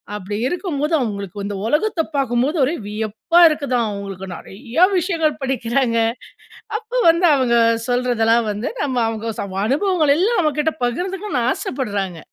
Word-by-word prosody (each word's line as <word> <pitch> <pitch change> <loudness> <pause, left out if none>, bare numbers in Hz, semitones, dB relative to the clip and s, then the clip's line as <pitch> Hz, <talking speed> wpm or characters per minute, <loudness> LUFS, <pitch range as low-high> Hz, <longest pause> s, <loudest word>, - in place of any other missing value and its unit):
அப்படி 205 0 -5
இருக்கும்போது 325 -3 -2
அவுங்களுக்கு 200 -4 -4
இந்த 200 0 -4
உலகத்த 325 - +1
பாக்கும்போது, 270 +3 0
ஒரே 305 - -1
வியப்பா 220 +10 0
இருக்குதாம். 255 -7 -1
அவுங்களுக்கு 195 -2 -6
நெறைய 240 - 0
விஷயங்கள் 325 -4 0
படிக்கிறாங்க. 250 -2 0 0.8
அப்போ 465 +2 -5
வந்து 335 +2 +4
அவுங்க 250 -3 +2 0.3
சொல்றதெல்லாம் 235 -2 +2
வந்து 210 +3 -3
நம்ம 260 -3 -2
அவுங்க 225 0 -3
ச - - -3 0.2
அனுபவங்கள் 310 - +2
எல்லாம் 425 +6 +2
நம்மகிட்ட 305 0 0
பகிர்ந்துக்கனுன்னு 355 - -2
ஆசப்படுறாங்க. 200 - -3
255 Hz, 125 wpm, -20 LUFS, 220-320 Hz, 0.8 s, வந்து